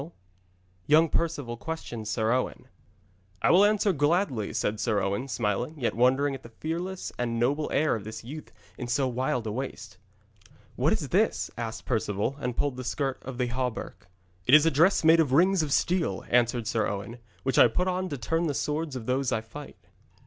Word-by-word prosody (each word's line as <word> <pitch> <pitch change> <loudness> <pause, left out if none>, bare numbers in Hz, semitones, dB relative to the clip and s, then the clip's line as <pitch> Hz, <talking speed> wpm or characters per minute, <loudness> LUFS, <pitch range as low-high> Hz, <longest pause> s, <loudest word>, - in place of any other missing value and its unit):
[Illustration: 160 - -12 0.7
YOUNG 155 +2 +5
PERCEVAL 145 -9 -2
QUESTIONS 120 -7 -6
SIR 110 0 0
OWEN] 125 +1 -1 0.8
'I - - +5
will 180 +4 +6
answer 205 -1 +3
gladly,' 145 - +1
said 105 0 -1
Sir 105 -1 +1
Owen, 100 +7 -2
smiling, 120 +4 -2
yet 125 - -1
wondering 130 +4 +2
at 135 - -7
the 115 - -12
fearless 170 +9 -4
and 115 -1 -1
noble 140 +6 +1
air 155 +1 +2
of 110 - -6
this 110 +1 -8
youth 150 +6 -9 0.3
in 125 - -4
so 130 +2 +1
wild 125 -1 -1
a 110 - -2
waste. 125 -5 -6 0.8
'What - - +2
is - - -1
this?' - - +1
asked 115 -1 -5
Perceval, 110 +1 -1
and 125 -4 -3
pulled 140 -3 0
the 130 - -5
skirt 135 +2 -2
of 130 -1 -7
the 125 -1 0
hauberk. 125 -4 -4 0.4
'It 130 - +8
is 155 +1 +7
a 165 - +4
dress 165 +8 +4
made 165 +1 +6
of 145 -5 +2
rings 185 +4 +4
of 150 -2 -3
steel,' 165 - 0
answered 120 -1 +2
Sir 110 0 0
Owen, 105 +4 -5 0.2
'which 135 -2 +1
I - - +9
put 180 +11 -1
on 185 0 -1
to 145 - -4
turn 165 +7 -1
the 145 - -2
swords 150 0 -2
of 120 -3 -6
those 130 +1 0
I 110 - 0
fight.' 145 +7 -11
130 Hz, 195 wpm, -27 LUFS, 115-155 Hz, 0.8 s, I